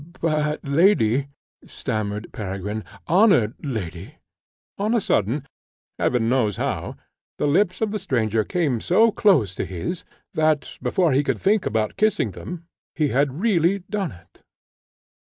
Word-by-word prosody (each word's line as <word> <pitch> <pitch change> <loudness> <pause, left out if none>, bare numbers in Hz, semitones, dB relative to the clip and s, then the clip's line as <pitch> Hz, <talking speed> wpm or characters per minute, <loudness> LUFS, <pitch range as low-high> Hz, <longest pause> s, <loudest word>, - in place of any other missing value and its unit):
"But, 150 -2 0
lady," 140 - +3 0.4
stammered 105 0 -4
Peregrine, 105 +1 -4 0.2
"honoured 175 - +4
lady 105 - -5 0.3
" - - -81
On 215 +4 +1
a - - +4
sudden, 130 - 0 0.5
Heaven 120 -2 +1
knows 115 -5 +1
how, - - -3 0.4
the - - 0
lips 185 +7 +2
of 220 -2 +1
the 215 - -2
stranger 115 - 0
came 145 - 0
so 220 +6 +4
close 150 - +3
to - - -3
his, 95 - -4 0.3
that, 155 -2 +1
before 180 -5 +2
he 140 +3 +3
could - - 0
think 205 0 +2
about 110 -1 -1
kissing 215 -1 +2
them, 175 -1 -8 0.3
he 150 -3 +1
had 140 +4 0
really 195 -3 +2
done 200 -6 -1
it. 85 - -18
145 Hz, 140 wpm, -23 LUFS, -, 0.5 s, honoured